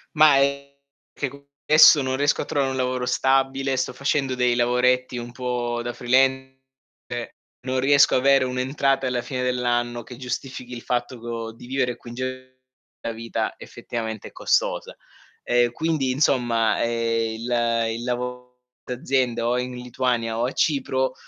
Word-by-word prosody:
Mah, 150 Hz, -2 st, +7 dB
è 140 Hz, 0 st, 0 dB, 0.3 s
che 140 Hz, -, -3 dB
co 140 Hz, +1 st, -13 dB, 0.2 s
esso 155 Hz, -1 st, +8 dB
non 130 Hz, 0 st, -1 dB
riesco 145 Hz, +1 st, +2 dB
a -, -, -4 dB
trovare 140 Hz, -2 st, 0 dB
un 130 Hz, -, -3 dB
lavoro 125 Hz, -1 st, -1 dB
stabile, 135 Hz, +1 st, +1 dB
sto 125 Hz, -, -1 dB
facendo 140 Hz, -1 st, 0 dB
dei 125 Hz, -1 st, +2 dB
lavoretti 125 Hz, +1 st, +2 dB
un 120 Hz, 0 st, -6 dB
po' 120 Hz, -2 st, -2 dB
da 120 Hz, -, -3 dB
freelance, 130 Hz, +1 st, +1 dB, 0.5 s
e 120 Hz, -1 st, -5 dB, 0.3 s
non 130 Hz, 0 st, -1 dB
riesco 140 Hz, +1 st, +5 dB
avere 135 Hz, 0 st, +4 dB
un'entrata 135 Hz, +1 st, 0 dB
alla 125 Hz, -1 st, -1 dB
fine 130 Hz, -2 st, -4 dB
dell'anno 120 Hz, -1 st, -1 dB
che 125 Hz, +1 st, -11 dB
giustifichi 125 Hz, 0 st, -6 dB
il 120 Hz, -, -7 dB
fatto 120 Hz, 0 st, -2 dB
co 115 Hz, -1 st, -5 dB
di 120 Hz, -, -13 dB
vivere 130 Hz, -1 st, -1 dB
qui 120 Hz, -, -13 dB
in -, -, -9 dB
Ge 130 Hz, 0 st, -6 dB, 0.4 s
la 115 Hz, -, -3 dB
vita 115 Hz, +1 st, -3 dB
effettivamente 110 Hz, -2 st, -6 dB
è -, -, -13 dB
costosa. -, -, 0 dB, 0.5 s
Ehm, 120 Hz, -1 st, +2 dB
quindi, 155 Hz, -2 st, -1 dB
insomma, 120 Hz, -5 st, +2 dB
ehm, 115 Hz, -1 st, 0 dB
il 115 Hz, -1 st, +1 dB
il 120 Hz, -, -6 dB
lavo 125 Hz, 0 st, -5 dB, 0.2 s
d'azienda, 125 Hz, -2 st, -1 dB
o 120 Hz, -, +1 dB
è -, -, +1 dB
in 125 Hz, 0 st, -5 dB
Lituania 125 Hz, -2 st, -1 dB
o 120 Hz, -, +1 dB
a 130 Hz, -, -2 dB
Cipro, 130 Hz, -3 st, 0 dB
125 Hz, 165 wpm, -23 LUFS, 120-135 Hz, 0.5 s, esso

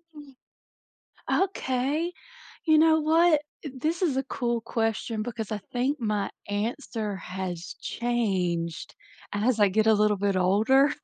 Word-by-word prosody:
Mhm. 290 Hz, -3 st, -13 dB, 1.1 s
Okay. 295 Hz, -1 st, -1 dB, 0.5 s
You 315 Hz, -1 st, +5 dB
know 315 Hz, 0 st, +5 dB
what? 320 Hz, 0 st, +4 dB, 0.2 s
Eh, -, -, -3 dB
this 315 Hz, +7 st, -2 dB
is 325 Hz, -8 st, +2 dB
a 270 Hz, -, +1 dB
cool 240 Hz, -3 st, -2 dB
question 225 Hz, -1 st, -2 dB
because 225 Hz, -2 st, -5 dB
I 215 Hz, -, -1 dB
think 260 Hz, +4 st, 0 dB
my 210 Hz, -3 st, -1 dB, 0.2 s
answer 215 Hz, 0 st, -3 dB
has 185 Hz, 0 st, -6 dB
changed 185 Hz, -9 st, -1 dB, 0.4 s
as 220 Hz, +3 st, +1 dB
I 205 Hz, -, +6 dB
get 220 Hz, +3 st, +2 dB
a 220 Hz, -, +7 dB
little 210 Hz, -1 st, +3 dB
bit 200 Hz, 0 st, 0 dB
older. 220 Hz, +10 st, +4 dB
230 Hz, 135 wpm, -27 LUFS, 205-280 Hz, 1.1 s, a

